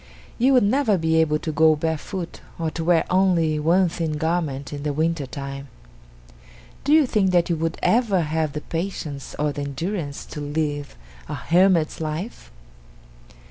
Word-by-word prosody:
You 260 +3 +4
would 250 - +5
never 220 -1 +2
be 160 -1 +1
able 155 -2 +3
to 155 - -4
go 155 +1 +4
barefoot 165 +3 -4 0.2
or 165 -1 -2
to 165 - -4
wear 170 0 +3
only 175 -5 +3
one 175 +5 +3
thin 165 -2 -2
garment 150 -4 -2
in 145 - -5
the 145 0 -2
winter 160 -1 0
time! 140 0 -6 1.2
Do 285 - 0
you 310 -1 +6
think 210 -6 +2
that 175 -1 +2
you - - +2
would 165 +1 -2
ever 220 -6 +3
have 155 -1 -1
the 150 - -4
patience 165 -5 -5
or 150 0 0
the 145 - -5
endurance 145 +2 -4
to 150 - -7
live 145 -1 -3 0.3
a - - -3
hermit's 175 -2 +2
life? 160 +8 -5
160 Hz, 165 wpm, -23 LUFS, 150-185 Hz, 1.2 s, you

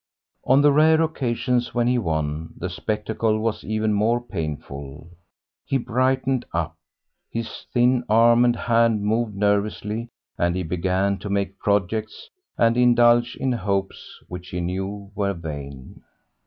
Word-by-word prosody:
On 135 +3 +5
the 145 - +6
rare 155 +2 +5
occasions 125 -5 -1
when 120 -1 +2
he 125 0 +2
won, 80 -4 -3
the 90 +1 -4
spectacle 110 +3 -1
was 110 0 -2
even 110 0 0
more 110 +4 +2
painful. 75 - -7 0.5
He 135 - 0
brightened 130 +1 0
up, 85 -2 -2 0.5
his 115 0 -6
thin 125 0 +3
arm 115 +2 +5
and 120 -1 +3
hand 115 -3 +2
moved 110 0 0
nervously, 105 +3 -1 0.3
and 85 0 +1
he 95 - -1
began 95 +3 0
to 105 - -6
make 100 0 -2
projects 105 +2 -1 0.3
and 115 +1 +3
indulge 120 -1 +4
in 130 - -1
hopes 100 -4 -3
which 90 0 -8
she 90 - -4
knew 95 +3 -4
were 100 -1 -1
vain. 70 -5 -8
105 Hz, 140 wpm, -23 LUFS, 95-120 Hz, 0.5 s, the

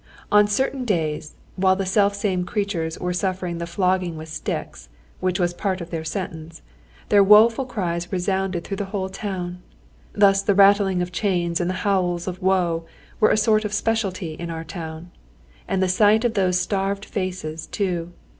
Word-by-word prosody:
On 210 0 +6
certain 260 +5 0
days 160 -9 -2 0.2
while 190 0 +4
the 195 0 -2
self 200 +1 +2
same 190 -3 -1
creatures 180 -5 -2
were 180 0 -2
suffering 180 -2 -2
the 170 - -4
flogging 180 -1 0
with 160 +1 -8
sticks, - - -5 0.3
which 185 0 -1
was 175 -1 +1
part 190 +1 -2
of 170 -1 -8
their 165 -2 -3
sentence, 165 -2 -6 0.5
their 200 -1 +6
woful 225 +5 +6
cries 175 -7 -3
resounded 190 -1 -1
through 195 - -5
the 205 - -2
whole 190 -1 -3
town. 185 -3 -5 0.5
Thus 195 -1 +4
the 200 0 +1
rattling 195 -2 +5
of 180 - -6
chains 175 -3 0
and 175 - -1
the 185 - -1
howls 180 -3 +1
of 185 +1 -5
woe 180 -3 +1 0.4
were 215 - +5
a - - +3
sort 215 0 +3
of 210 -1 -4
speciality 205 -6 -1
in 170 +2 -6
our 165 -1 -5
town. 165 0 -8 0.6
And 190 0 0
the - - +2
sight 210 +5 +4
of 235 - +1
those 185 -3 +2
starved 195 +2 -1
faces 180 -5 -4
too! 175 -4 -2
185 Hz, 175 wpm, -23 LUFS, 175-200 Hz, 0.6 s, On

